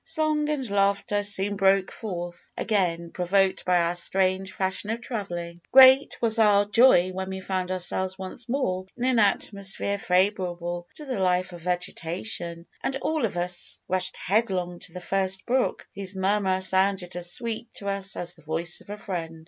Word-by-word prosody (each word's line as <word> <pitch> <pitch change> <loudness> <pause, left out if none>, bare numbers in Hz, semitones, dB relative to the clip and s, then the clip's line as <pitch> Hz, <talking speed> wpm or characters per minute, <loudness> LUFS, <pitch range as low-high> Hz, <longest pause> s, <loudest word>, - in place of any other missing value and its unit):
Song 310 -2 0
and 280 -4 -2
laughter 200 +1 +1
soon 205 0 +2
broke 195 -1 +2
forth 175 -5 -7
again, 170 -5 -1
provoked 190 +1 +1
by 180 -1 +3
our 170 0 +1
strange 190 +2 0
fashion 190 +2 -2
of 225 +1 -2
travelling. 175 -8 -6
Great 265 +1 +7
was 230 -1 +3
our 205 -2 +5
joy 205 -4 +5
when 190 +1 -5
we 190 0 -5
found 185 -1 -3
ourselves 185 +1 -2
once 195 +5 -8
more 190 -9 -1
in 245 - -4
an 255 -2 +2
atmosphere 200 -1 +1
favourable 180 -2 -1
to 300 - -7
the 255 -6 -3
life 180 -1 +1
of 175 - -10
vegetation, 175 0 -3 0.2
and 270 - -2
all 310 -1 -1
of 190 -5 -4
us 175 0 +1
rushed 185 0 0
headlong 185 -3 -1
to - - -3
the 180 - -7
first 190 +1 0
brook, 255 +1 -1
whose 195 0 -5
murmur 190 0 +1
sounded 190 -1 +1
as 175 0 0
sweet 230 +1 -3
to 200 - -5
us 195 -1 -1
as 175 - -3
the 165 - -18
voice 160 +3 0
of - - -19
a 205 - -6
friend. 165 -6 -5
190 Hz, 175 wpm, -25 LUFS, 180-210 Hz, 0.2 s, Great